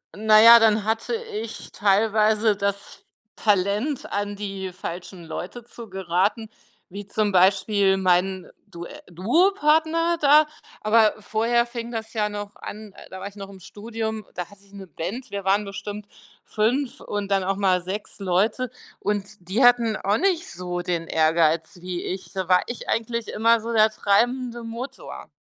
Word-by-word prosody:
na 215 +1 +5
ja, 235 +1 +10
dann 215 -2 +3
hatte 225 - -1
ich 230 - -7
teilweise 215 +1 +2
das 200 0 0
f 200 - -15 0.4
Talent, 210 +7 0
an 205 0 -2
die 195 -2 -5
falschen 175 0 -7
Leute 180 +8 -7
zu 235 -2 -11
geraten, 190 +4 -1 0.4
wie 200 +2 -8
zum 210 0 0
Beispiel 195 +1 +3
mein 185 0 +1 0.2
Due 175 -3 -9 0.2
Duopartner 320 - +2
da, 300 +2 +6 0.3
aber 215 0 +4
vorher 230 +3 +1
fing 235 -1 -6
das 225 -1 -6
ja 210 -2 0
noch 205 0 -7
an, 210 -1 -9 0.2
da 190 - -7
war 200 - -6
ich 200 - -12
noch 195 0 -8
im 195 -1 -12
Studium, 220 +1 -5
da 180 -1 -5
hatte 200 -1 -18
ich 200 - -23
'ne 195 -2 -10
Band, 180 - -6
wir 200 -1 -4
waren 200 +2 +2
bestimmt 205 +1 -7 0.4
5 240 +5 -1
und 205 -1 -4
dann 195 -1 +2
auch 195 +1 0
mal 185 -3 +2
6 195 +4 -6
Leute. 210 +7 0 0.3
Und 205 0 -1
die 190 +8 -1
hatten 240 -3 +4
auch 200 +2 0
nicht 360 -3 0
so 175 0 -4
den 175 -2 -3
Ehrgeiz 160 +2 +2
wie 180 -1 -5
ich. 185 -2 -6
Da 190 -2 -3
war 180 0 +5
ich 240 - -7
eigentlich 230 0 -1
immer 230 +1 +3
so 230 +1 -5
der 220 -1 +5
treibende 240 +4 0
Motor. 230 +4 -8
205 Hz, 165 wpm, -24 LUFS, 190-230 Hz, 0.4 s, ja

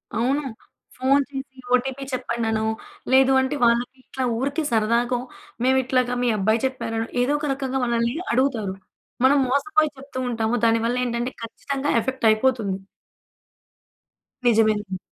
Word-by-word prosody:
అవును. 260 +6 +1 0.6
ఫోన్ 275 +2 +3
చేసి 270 -1 -7 0.2
ఓటీపీ 265 +2 +1
చెప్పండనో, 225 -3 -1 0.5
లేదు 265 0 +6
అంటే 265 +2 -1
వాళ్లకి 240 +2 +2
ఇట్లా 260 0 -5
ఊరికే 280 +5 -1
సరదాగో, 235 +2 +2 0.4
"మేము 260 +1 +4
ఇట్లాగా 255 -1 +1
మీ - - +2
అబ్బాయి 220 +4 +1
చెప్పారనో" 225 -4 -2 0.2
ఏదో 260 +4 +2
ఒక 300 - -3
రకంగా 265 -1 -2
మనల్ని 235 0 0 0.2
అడుగుతారు. 235 -7 +1 0.5
మనం 285 +2 +5
మోసపోయి 305 +4 +2
చెప్తూ 270 0 -10
ఉంటాము. 225 0 0
దానివల్ల 230 +2 +2
ఏంటంటే 240 +1 -2
ఖచ్చితంగా 275 +5 -4
ఎఫెక్ట్ 260 +1 -3
అయిపోతుంది. 215 -3 +1 1.7
నిజమేనండి. 215 -4 +2
245 Hz, 125 wpm, -23 LUFS, 230-265 Hz, 1.7 s, లేదు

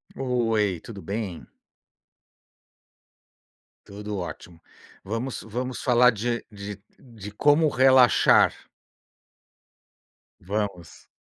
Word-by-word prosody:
Oi, 115 -8 0
tudo 100 -4 -10
bem? 100 -4 -5 2.4
Tudo 105 +1 -7
ótimo. 90 -2 -8 0.4
Vamos 115 +6 -4
vamos 125 +3 -5
falar 125 -1 +5
de 115 +2 -3
de 100 -1 -8 0.2
de 110 -5 -11
como 145 +8 +3
relaxar. 130 -2 +5 1.9
Vamos. 100 -3 -5
110 Hz, 75 wpm, -25 LUFS, 100-125 Hz, 2.4 s, falar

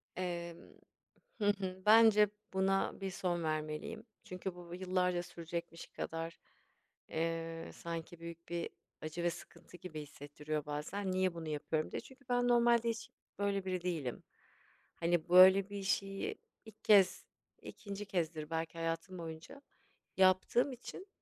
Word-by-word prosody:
Emm, 170 -2 -3 0.8
hı 210 - 0
hı, 190 -1 -4
bence 215 -1 +8 0.3
buna 195 +1 +1
bir 195 0 -2
son 175 -2 -1
vermeliyim. 155 +6 -3 0.2
Çünkü 185 0 -5
bu 175 -1 -11
b 175 - -4
yıllarca 180 -1 +1
sürecekmiş 170 0 -6
kadar, 165 0 -5 0.7
eee, 165 0 -2
sanki 170 0 -6
büyük 170 0 -9
bir 170 0 -2 0.3
acı 155 +2 -4
ve 175 - +3
sıkıntı 175 +1 -11
gibi 160 -3 -7
hissettiriyor 150 +1 -5
bazen. 175 +7 -3
Niye 185 -1 +1
bunu 165 -2 -6
yapıyorum 155 +1 -1
diye. - - -3
Çünkü 270 +1 -16
ben 245 0 +2
normalde 235 -1 +5
hiç 230 0 -5 0.3
böyle 200 -1 0
biri 185 -2 -2
değilim 160 -9 -2 0.7
hani 170 -1 +1
böyle 190 +2 +8
bir 200 -1 -4
şeyi 195 0 -1 0.3
ilk 220 -1 -15
kez 200 -3 +6 0.4
2. 205 -1 -7
kezdir 160 -4 -2
belki 165 0 -3
hayatım 165 +3 -3
boyunca 160 - -8 0.6
yaptığım 190 +8 +4
için 255 - -9
180 Hz, 135 wpm, -35 LUFS, 165-195 Hz, 0.8 s, bence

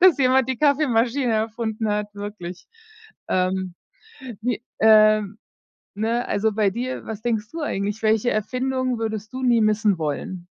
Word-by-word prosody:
dass 360 -4 +6
jemand 260 -1 +3
die 260 - -1
Kaffeemaschine 265 -4 +2
erfunden 220 0 -2
hat, 210 0 -2
wirklich.“ 200 -4 -7 0.6
Ähm, 185 -1 0 0.7
die 245 -1 -1 0.2
ähm, 215 -1 +5 0.6
ne, 225 +3 -1
also 215 +2 +1
bei 210 -1 +2
dir, 250 +5 -4
was 220 -1 -6
denkst 225 -3 -1
du 330 - -5
eigentlich, 205 -4 -2
welche 220 +2 +2
Erfindung 255 +3 -1
würdest 220 0 -4
du 260 - -5
nie 240 -3 +4
missen 215 -3 +2
wollen? 170 +4 -4
220 Hz, 140 wpm, -23 LUFS, 205-245 Hz, 0.7 s, dass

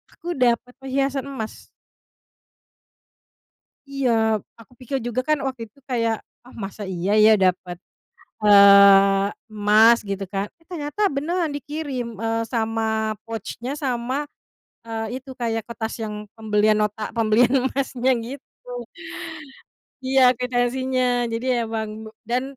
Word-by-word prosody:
Aku 350 +1 -5
dapet 250 0 +1
perhiasan 270 0 -1
emas. 225 -6 -7 2.2
Iya. 275 -3 0 0.5
Aku 230 +1 -17
pikir 260 +2 -3
juga 240 +1 -2
kan 305 +2 +2
waktu 260 -3 -4
itu 250 - -26
kayak, 230 -3 0 0.2
"Ah, 250 - -16
masa 205 +2 -6
iya 190 +1 -2
ya, 215 +1 +7
dapet, 185 -1 0 0.7
eee, 200 -1 +7 0.2
emas?" 215 +3 +5
gitu 200 -1 -4
kan. 195 +1 -3
Eh 330 - -30
ternyata 350 +4 -2
beneran 330 +4 -1
dikirim, 280 -6 -5
eee, 225 +1 -1
sama 220 -1 -1
pouch-nya, 235 +4 -5
sama, 260 +1 -2 0.6
eee, 225 +1 -4
itu 265 +1 -11
kayak 225 -3 -3
kertas 225 -1 -5
yang 210 -1 -6
pembelian 215 -1 +2
nota, 210 0 -2
pembelian 230 +2 +3
emasnya, 265 -1 0
gitu. 245 -1 -9 1.2
Iya, 265 0 +3 0.2
kuitansinya. 250 0 0
Jadi 230 +2 -4 0.2
emang 220 -1 -5
be - - -8
dan 240 +3 -1
235 Hz, 120 wpm, -23 LUFS, 215-260 Hz, 2.2 s, ya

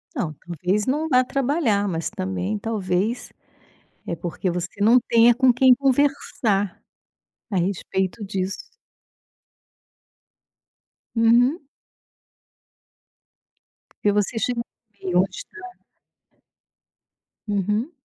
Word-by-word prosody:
Não, 175 - -2
talvez 180 +6 -2
não 300 +4 0
vá 255 -3 +4
trabalhar 255 -6 0
mas 165 -3 -2
também 190 0 -3
talvez 205 +1 -2 0.8
é 170 - -2
porque 175 +2 -3
você 180 +3 -4
não 235 +4 +6
tenha 230 0 +5
com 255 -1 +4
quem 255 0 +6
conversar, 260 -7 0 0.7
a 190 - 0
respeito 190 +2 -2
disso. 190 0 -3 2.5
Uhum. 240 +7 +4 2.4
Porque 205 -1 +2
você 210 +2 0
chegou 235 +2 -1 0.3
no - - -36
meio 185 -2 -2
da 180 - +4
onde 190 - 0
está. 420 -7 -11 1.7
Uhum. 210 - -1
210 Hz, 95 wpm, -23 LUFS, 190-250 Hz, 2.5 s, não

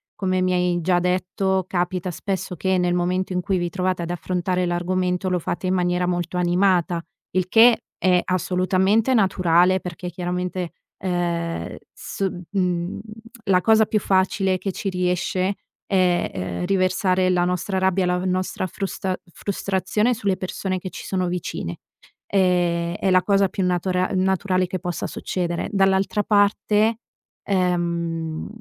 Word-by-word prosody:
come 185 -2 0
mi 185 0 +1
hai 180 -1 +1
già 175 +1 +2
detto, 185 +1 0
capita 180 0 -1
spesso 185 +1 -4
che 190 +2 +1
nel 175 0 +1
momento 185 +2 0
in 180 - 0
cui 195 0 0
vi 175 - -1
trovate 185 0 -1
ad 170 - -4
affrontare 180 +1 -1
l'argomento 180 +1 -1
lo 180 - +1
fate 175 +2 -3
in 185 - +1
maniera 180 0 +1
molto 175 0 -2
animata; 175 -1 +2 0.3
il 185 -1 +1
che 230 +3 +6 0.2
è 180 -1 +4
assolutamente 185 +6 +1
naturale, 185 -4 +3
perché 180 0 -6
chiaramente, 180 0 -3 0.3
ehm, 170 -2 -2 0.2
s 195 -1 -3 0.2
mhmm, 180 -2 -1 0.5
la 185 -2 +3
cosa 220 -1 +5
più 215 0 0
facile 190 0 +1
che 195 +1 -3
ci 195 - -5
riesce, 180 +1 0 0.3
è, 185 -3 +2
ehm, 90 - -3
riversare 185 0 +2
la 180 -1 +2
nostra 180 +2 -1
rabbia, 190 0 +2
la 180 0 +1
v 180 - -4
nostra 185 0 -1
frusta 190 0 -3 0.2
frustrazione 200 +3 0
sulle 200 -5 -1
persone 185 0 -3
che 185 - -6
ci - - -9
sono 185 -2 -1
vicine; 175 - -4 0.5
ehm, 175 -3 +1
è 190 - 0
la 185 -1 +4
cosa 200 -1 +3
più 190 +1 -3
natura 180 +1 0
naturale 185 0 +1
che 185 - -3
possa 175 0 -3
succedere, 175 -2 -3
dall'altra 195 +1 +2
parte, 210 +2 +2 0.4
ehm, 170 -4 -1
185 Hz, 145 wpm, -23 LUFS, 175-190 Hz, 0.5 s, che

